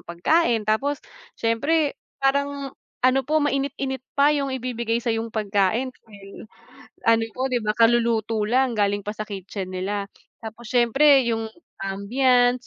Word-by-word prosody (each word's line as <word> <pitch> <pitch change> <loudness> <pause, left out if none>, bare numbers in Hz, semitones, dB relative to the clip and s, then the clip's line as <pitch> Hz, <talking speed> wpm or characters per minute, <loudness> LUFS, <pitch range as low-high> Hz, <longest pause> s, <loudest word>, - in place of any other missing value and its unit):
pagkain, 225 - +1
tapos 270 +7 0 0.4
siyempre 285 +7 +1 0.2
parang 280 0 -1 0.3
ano 255 +1 +4
po 300 +4 -1
mainit-init 275 -2 -1 0.2
pa 285 +1 +5
yung 280 -2 -1
ibibigay 240 -3 -2
sayong 230 -1 -2
pagkain 215 +3 0
okey, 205 -1 -14 0.6
ano 230 0 +4
po 260 - +1
'di 245 -3 -1
ba 210 - 0
kaluluto 230 -1 +2
lang 250 +3 +1
galing 205 -1 0
pa 210 - -3
sa 215 - -4
kitchen 195 -2 -6
nila 200 +2 -3 0.3
tapos 225 +2 -9
siyempre 265 +3 +5
yung 225 -1 -1 0.3
ambiance, 245 +5 +1
235 Hz, 135 wpm, -23 LUFS, 215-270 Hz, 0.6 s, pa